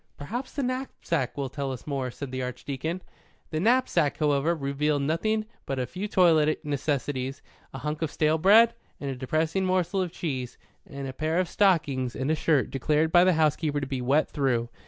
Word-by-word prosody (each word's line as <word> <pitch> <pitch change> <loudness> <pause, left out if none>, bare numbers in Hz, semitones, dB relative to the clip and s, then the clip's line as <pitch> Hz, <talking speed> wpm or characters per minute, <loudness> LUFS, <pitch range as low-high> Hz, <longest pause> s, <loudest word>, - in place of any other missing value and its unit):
"Perhaps 240 - -5
the 280 - -2
knapsack 245 - -2
will 140 -1 -1
tell 140 0 -4
us 130 - -7
more," 135 -3 -2
said 130 +2 -7
the 130 0 -3
Archdeacon. 135 +7 -4 0.5
The 155 - -1
knapsack, 205 - +2
however, 150 +2 +2
revealed 145 0 0
nothing 215 +9 0 0.2
but 135 - -2
a 130 - 0
few 190 +9 -5
toilet 160 -7 +3
necessaries, 140 -2 -2 0.3
a - - -7
hunk 150 +3 -4
of 160 - 0
stale 155 +2 +1
bread 220 +7 +6 0.3
and 140 -1 -3
a - - -4
depressing 155 +8 0
morsel 185 0 +1
of 180 -2 -2
cheese, 130 -8 -4 0.3
and 140 -2 -6
a 130 - -5
pair 155 +4 -1
of 185 - +1
stockings 145 -12 +1
and 135 +4 -1
a - - +3
shirt 155 -3 +1
declared 150 +4 +1
by 175 +1 +7
the 185 0 +4
housekeeper 155 -1 +1
to 140 - -3
be 130 -1 -3
wet 140 +5 +2
through. 125 -5 0
150 Hz, 190 wpm, -27 LUFS, 135-175 Hz, 0.5 s, by